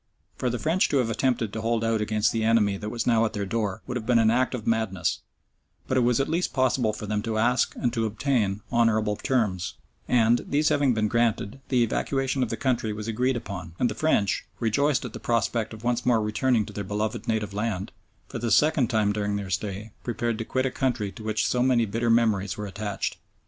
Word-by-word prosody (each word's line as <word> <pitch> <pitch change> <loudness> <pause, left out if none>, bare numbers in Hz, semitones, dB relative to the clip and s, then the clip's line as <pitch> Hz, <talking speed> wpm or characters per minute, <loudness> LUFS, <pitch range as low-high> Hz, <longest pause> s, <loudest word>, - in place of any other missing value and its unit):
For 125 - -1
the 120 - -2
French 165 +8 +1
to 140 - +2
have 120 -3 +1
attempted 115 -2 0
to 110 - -3
hold 115 0 0
out 115 -1 +1
against 105 0 +1
the 115 -1 -1
enemy 110 -3 +3
that 105 +2 -5
was 115 +1 -3
now 115 -2 +3
at 115 - -1
their 100 -2 -2
door 100 -1 -2
would 125 - -5
have 110 - -6
been 125 -2 +4
an 110 -1 +4
act 125 +2 +1
of 115 - -6
madness, 110 -5 0 0.7
but 130 - 0
it - - +4
was 120 0 +2
at 135 - +1
least 170 +3 -1
possible 130 -4 +2
for 105 0 -7
them 105 0 -1
to 110 0 -2
ask 125 +3 +2
and 120 -2 -1
to 115 -2 0
obtain 110 -3 0
honourable 110 -3 +2
terms; 105 -8 -1 0.3
and 120 -1 +3
these 150 +2 +2
having 140 -4 +2
been 110 -1 +1
granted, 115 +1 0
the 125 -3 +3
evacuation 135 +3 -1
of 125 - 0
the 115 - -3
country 125 -5 0
was 105 +1 -5
agreed 125 +4 0
upon, 90 -6 -7
and 120 - +1
the - - -2
French, 105 -11 +1 0.2
rejoiced 140 +5 +1
at - - -7
the - - -6
prospect 115 -1 0
of 110 0 -10
once 120 0 0
more 120 -2 +3
returning 110 +1 +1
to - - -10
their 100 - -4
beloved 105 +2 -3
native 110 -2 -1
land, 105 -2 -2 0.4
for - - -6
the 120 - -1
second 145 +2 +4
time 105 -2 +2
during 105 0 -1
their 100 -2 -4
stay 105 +2 -3
prepared 120 -1 -2
to - - -1
quit 130 +2 -1
a 130 - 0
country 120 -7 -1
to 110 - -11
which 110 -1 0
so 125 - +1
many 125 -2 +3
bitter 115 +3 -1
memories 105 -5 +2
were 105 - -4
attached. 100 +1 -4
115 Hz, 225 wpm, -26 LUFS, 105-125 Hz, 0.7 s, been